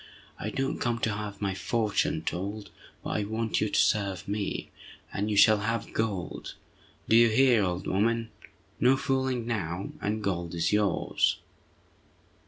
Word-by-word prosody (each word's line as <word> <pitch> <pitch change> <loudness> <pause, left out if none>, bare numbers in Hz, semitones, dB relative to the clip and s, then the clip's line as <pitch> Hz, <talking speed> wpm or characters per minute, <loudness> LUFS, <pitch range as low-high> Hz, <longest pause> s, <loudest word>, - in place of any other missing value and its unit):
I 105 - -3
don't 135 +4 -2
come 120 -1 0
to 110 - +1
have 105 0 -5
my 100 -1 0
fortune 105 +2 0
told, 100 +4 -4 0.3
but - - -4
I 105 - 0
want 110 +2 -1
you 105 - +1
to - - +1
serve 100 -4 +1
me, 100 0 -3 0.4
and 105 +2 -1
you 105 - 0
shall 105 +1 +7
have 115 +1 -2
gold—do 110 +1 -4
you 115 0 +7
hear, 120 -1 +4
old 90 -1 -2
woman? 115 +4 0 0.5
No 130 +3 +5
fooling 130 -3 0
now, 100 -5 -3
and 105 +1 -2
gold 85 -3 -2
is 85 +3 0
yours!" 105 -1 +2
105 Hz, 150 wpm, -28 LUFS, 100-115 Hz, 0.5 s, shall